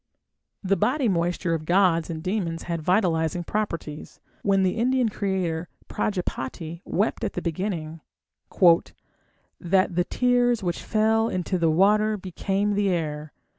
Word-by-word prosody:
The 195 +1 +2
body 260 +5 +1
moisture 175 -2 0
of 160 -1 -2
gods 175 -2 +3
and 160 -1 -5
demons 180 -4 -2
had 170 -2 -3
vitalizing 175 -2 +1
properties. 165 -7 -4 0.2
When 195 -1 +2
the 185 +3 0
Indian 250 0 +2
creator, 185 -5 -2 0.2
Prajápati, 170 -4 -3
wept 210 +4 -1
at 210 - -2
the - - -2
beginning, 165 -2 -3 0.6
"that 180 +1 0
(the 175 0 +2
tears) 245 -2 +2
which 175 -2 -2
fell 220 +1 +2
into 185 0 -2
the 165 -1 +3
water 210 +6 +3
became 195 +2 -1
the 200 -1 +1
air. 155 -4 -2
185 Hz, 135 wpm, -25 LUFS, 165-210 Hz, 0.6 s, gods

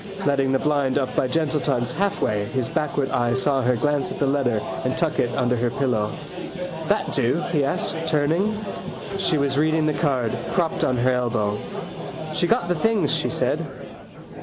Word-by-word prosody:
Letting 140 -2 +2
the 135 - +4
blind 145 -2 +1
up 135 -2 -1
by 130 - +2
gentle 155 +2 +1
tugs 125 -4 0
halfway 190 - 0
his 130 +2 -2
backward 145 -2 -1
eye 120 0 +1
saw 135 +1 +2
her 125 0 +2
glance 145 +6 0
at - - -5
the 145 - +1
letter 135 -5 +1 0.2
and - - -1
tuck - - 0
it - - +2
under 125 -1 +2
her 120 0 +1
pillow. 115 -5 0 0.8
—That 205 - +1
do? 125 -1 +3 0.2
he 150 -4 +2
asked, 140 - -1
turning. 175 +9 +1 0.5
She 180 -4 +2
was 140 0 +1
reading 155 0 +3
the 155 - +2
card, 135 -6 0 0.2
propped 170 -3 +1
on 130 - +2
her 125 +2 +3
elbow. 110 -4 0 0.7
—She 175 - +1
got 175 - +2
the 175 - +2
things, 225 +6 +2
she - - 0
said. - - 0
140 Hz, 180 wpm, -23 LUFS, 125-155 Hz, 0.8 s, the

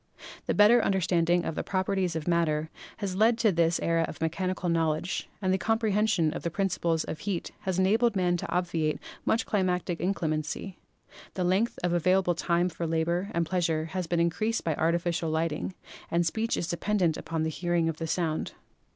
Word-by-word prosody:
The - - +1
better 220 +3 +6
understanding 175 -2 +2
of - - -2
the - - -2
Properties 190 -2 -1
of 160 0 -4
Matter 160 -2 +1 0.3
has 195 -3 -3
led 225 +3 +4
to 225 -3 +3
this 170 -1 +2
era 165 0 +2
of - - -8
Mechanical 180 +3 -2
Knowledge, 165 +1 0
the 190 0 +2
comprehension 215 -6 +1
of - - -5
the 170 - -2
principles 170 -3 0
of 155 - -6
heat 195 -5 -3
has 190 -2 0
enabled 220 +5 +3
man 180 -2 +2
to - - -5
obviate 170 -4 0 0.3
much 225 - +1
climatic 180 -3 0
inclemency; 165 0 -2 0.6
the 185 - -1
length 190 +6 +1
of 175 -1 +1
available 185 +1 +3
time 170 +1 +1
for 170 -1 -4
labor 170 +4 0
and 170 0 +1
pleasure 165 -2 0
has 185 -3 -2
been 170 0 0
increased 215 +7 0
by 160 - 0
artificial 170 +1 0
lighting, 160 +3 -2 0.3
and 170 +1 +1
speech 220 +7 0
is 170 - -2
dependent 175 -2 +1
upon 160 -1 -3
the 160 - 0
hearing 175 0 0
of 165 -1 -2
the 165 - -4
Sound. 160 -2 -1
175 Hz, 175 wpm, -28 LUFS, 165-190 Hz, 0.6 s, better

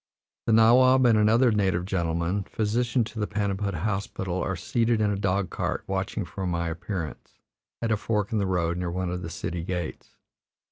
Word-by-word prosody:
The 115 - +3
nawab 130 +3 +6
and 115 -2 +5
another 115 +4 +4
native 95 -4 +1
gentleman, 90 +1 -1
physician 120 +3 0
to 110 0 -7
the 105 - 0
Paniput 100 -1 -1
Hospital, 95 -1 -2
are 95 - -1
seated 115 +6 0
in 105 -1 +2
a - - 0
dog 95 -1 0
cart - - -2
watching - - -2
for 95 -1 -5
my 85 -1 -1
appearance, 85 -1 -5 0.5
at 115 - 0
a 110 - +3
fork 105 0 -1
in 110 - +1
the 100 - 0
road 85 -2 0
near 90 -1 -2
one 90 0 -2
of 90 0 -3
the 80 - -5
city 85 0 -4
gates. 90 -2 -5
100 Hz, 185 wpm, -26 LUFS, 90-110 Hz, 0.5 s, nawab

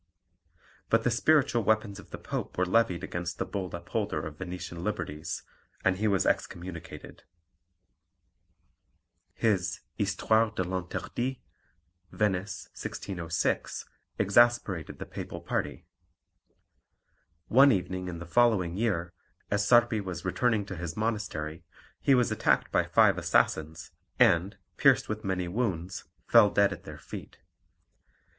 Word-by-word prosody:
But 115 0 +3
the 125 - +2
spiritual 135 -2 +3
weapons 110 -1 +1
of - - -14
the - - -7
Pope - - -5
were 90 - +2
levied 90 -2 +2
against 85 0 -4
the - - -2
bold 95 -4 -4
upholder 85 -2 -3
of 80 -1 -8
Venetian 90 -2 -6
liberties, 80 -6 -4 0.4
and 95 -1 +3
he 110 +2 +1
was 100 -3 +2
excommunicated. 85 -1 -4 2.1
His 100 -6 0
Histoire 110 +3 +2
de 95 - 0
l'Interdit 95 +8 -3 0.7
(Venice, 100 -1 -1
1606) 85 -3 -3 0.3
exasperated 100 -6 +2
the - - -6
Papal - - -7
party. - - -3 1.6
One 135 +4 +7
evening 95 -3 -1
in 85 -2 -5
the 85 - -7
following 95 -4 +2
year, 95 -6 -1 0.4
as 100 0 +1
Sarpi 120 -1 +5
was 90 -3 -6
returning 110 +2 +1
to 95 - -6
his 85 +1 -5
monastery, 105 -8 -3 0.4
he 135 - +4
was 125 -2 +2
attacked - - +1
by - - +2
five - - +4
assassins, 80 +1 0 0.3
and, 85 +4 +4 0.2
pierced - - +4
with 110 0 -4
many 95 -3 -1
wounds, 95 -3 -2 0.2
fell 115 -3 +6
dead 100 0 +3
at - - -12
their - - -8
feet. - - -9
95 Hz, 125 wpm, -29 LUFS, 85-110 Hz, 2.1 s, One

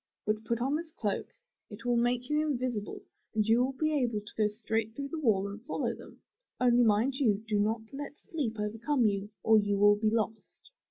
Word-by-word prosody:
Then 215 +1 0
put 235 +1 -2
on 270 +4 +1
this 330 0 -7
coat; 205 -3 -2 0.4
it 225 +2 -10
will 245 0 +2
make 245 +1 +1
you 300 0 +2
invisible 245 -6 -3 0.3
and 215 -1 +2
you 230 +3 +4
will 265 +1 -1
be 310 +3 0
able 245 -7 +1
to 210 - -12
go 215 -1 +3
straight 220 +1 -2
through 280 +1 -4
the 325 - -4
wall 205 -8 +2
and 205 +2 -7
follow 305 - -1
them. - - -13 0.4
Only 245 -1 +5
mind 230 +5 +2
you, 220 -6 +2
do 210 -1 +1
not 215 +2 +1
let 290 +1 -6
sleep 295 - -3
overcome 225 +5 0
you 200 -1 0
or 220 -1 +6
you 205 -1 0
will 205 +1 +6
be 215 +1 +2
lost.'' 220 - -3
225 Hz, 210 wpm, -30 LUFS, 210-255 Hz, 0.4 s, or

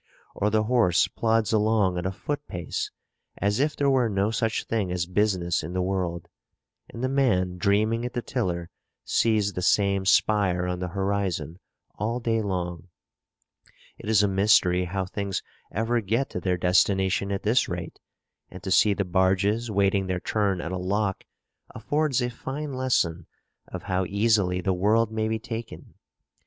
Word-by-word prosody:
Or 105 - 0
the 110 0 +2
horse 110 -6 +3
plods 115 -1 0
along 105 -3 +2
at 90 - -2
a - - -1
foot 145 +9 -5
pace 90 -1 -4 0.5
as 100 +3 0
if 150 +2 +1
there 140 - +1
were 130 -4 +3
no 100 +1 0
such 115 0 -1
thing 105 -5 -2
as 90 -2 -1
business 90 -2 0
in 80 +3 -6
the 90 - 0
world; 90 -3 -2 0.6
and 115 - -7
the - - +2
man 95 -10 +1
dreaming 110 +5 +2
at 125 - -4
the 120 -2 -3
tiller 85 -9 -3 0.3
sees 105 -3 +2
the 90 - -4
same 100 0 +2
spire 95 -4 +3
on 90 0 -2
the 90 - -3
horizon 95 -3 -2 0.4
all 115 +4 -1
day 115 -2 0
long. 90 -4 -3 1.1
It - - -7
is 105 -2 +4
a - - +3
mystery 95 -2 +3
how 95 +2 -2
things 100 +1 -3 0.3
ever 115 +2 0
get 115 +7 -1
to - - -3
their 90 0 0
destination 95 +2 +2
at 100 - -2
this 115 +4 +2
rate; 90 -1 -6 0.5
and 90 - -11
to 95 - -4
see 105 +2 +4
the 100 - -1
barges 95 +5 +1
waiting 100 -1 +1
their 90 -1 -1
turn 100 -2 0
at 85 - -5
a 95 - -3
lock, 100 +1 -1 0.5
affords 140 +2 0
a 120 - -2
fine 140 +4 -5
lesson 95 -11 0 0.4
of - - -7
how 95 0 -1
easily 100 -3 +1
the 95 +1 0
world 110 +5 +2
may 110 0 -1
be 110 0 0
taken. 115 0 -7
100 Hz, 170 wpm, -26 LUFS, 90-115 Hz, 1.1 s, is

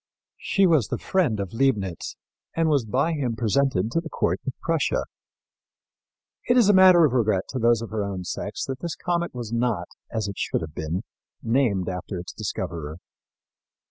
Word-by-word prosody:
She 195 - +2
was 155 - +4
the - - -2
friend 160 - +1
of 100 0 -4
Leibnitz, 105 - 0 0.4
and 165 0 +2
was 140 -6 +2
by 135 +9 +1
him 130 -7 -1
presented 115 -2 +1
to 165 - +1
the 165 - -8
court - - 0
of 135 - -1
Prussia. 165 -2 0 1.4
It 245 - +4
is 235 -5 +6
a - - +7
matter 185 -3 +8
of 135 - +1
regret 110 -6 +2
to 130 - -3
those 115 -1 +3
of 115 - -8
her 110 -2 -1
own 95 -2 -4
sex 105 +3 -4
that 135 -1 -5
this 170 -2 -4
comet 170 -4 -2
was 120 -2 -5
not, 115 -7 0 0.2
as 110 -2 -2
it 100 - -6
should - - -1
have 80 -2 -6
been, 80 +4 -3 0.4
named 115 -6 +1
after 90 +1 -4
its 85 -1 -7
discoverer. 80 -2 -4
115 Hz, 180 wpm, -25 LUFS, 100-155 Hz, 1.4 s, matter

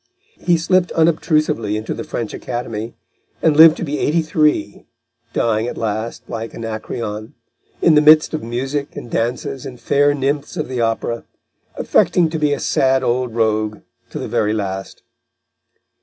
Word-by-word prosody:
He 175 -1 +2
slipped 180 +2 +1
unobtrusively 155 -9 +1
into 110 - -4
the - - -5
French 115 -3 -4
Academy, 115 -2 -5 0.4
and 155 -2 +2
lived 160 +1 +8
to - - -4
be 150 -2 -3
eighty 160 +2 +1
three, 150 -8 0 0.4
dying 115 0 0
at - - -5
last, 110 +1 -3
like 115 -1 -6
Anacreon, 110 -1 -5 0.5
in 165 - +6
the 150 - +6
midst 155 +1 +6
of 155 - -2
music 135 +5 -3
and 120 - -8
dances 120 +3 -2
and 125 -2 -8
fair 145 +1 +2
nymphs 145 +4 -2
of 155 - -3
the 125 -2 -2
Opera, 115 +1 -1 0.5
affecting 170 -3 +2
to 160 - -2
be 150 -1 +2
a 145 - 0
sad 130 0 +2
old 120 -1 -1
rogue 110 -2 0 0.3
to - - -7
the - - -4
very 110 -2 0
last. 95 -2 -4
125 Hz, 155 wpm, -19 LUFS, 110-150 Hz, 0.5 s, lived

